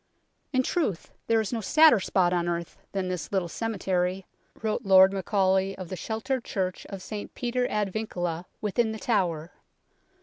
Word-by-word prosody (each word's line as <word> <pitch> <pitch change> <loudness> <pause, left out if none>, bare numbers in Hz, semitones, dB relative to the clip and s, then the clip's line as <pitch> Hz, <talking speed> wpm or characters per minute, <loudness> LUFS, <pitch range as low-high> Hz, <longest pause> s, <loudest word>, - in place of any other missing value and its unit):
" - - -47
In 260 -2 +2
truth, 250 - -1 0.2
there 225 0 +3
is 220 +2 -2
no 230 - -1
sadder 310 +1 +6
spot 180 -2 +2
on 175 -1 0
earth 170 -1 -3 0.2
than 190 -2 -2
this 180 -3 -4
little 190 -3 0
cemetery," 185 -2 -1 0.4
wrote 220 +1 0
Lord 190 -1 +7
Macaulay 190 0 +1
of 185 -3 -7
the 185 - -4
sheltered 225 +6 -3
church 185 -3 -3
of 195 -2 -7
St 210 -1 -7
Peter 250 0 -1
ad 205 -3 -1
Vincula 175 -6 -3 0.2
within 220 +2 0
The - - -5
Tower. 175 -8 0
195 Hz, 170 wpm, -27 LUFS, 180-220 Hz, 0.4 s, Lord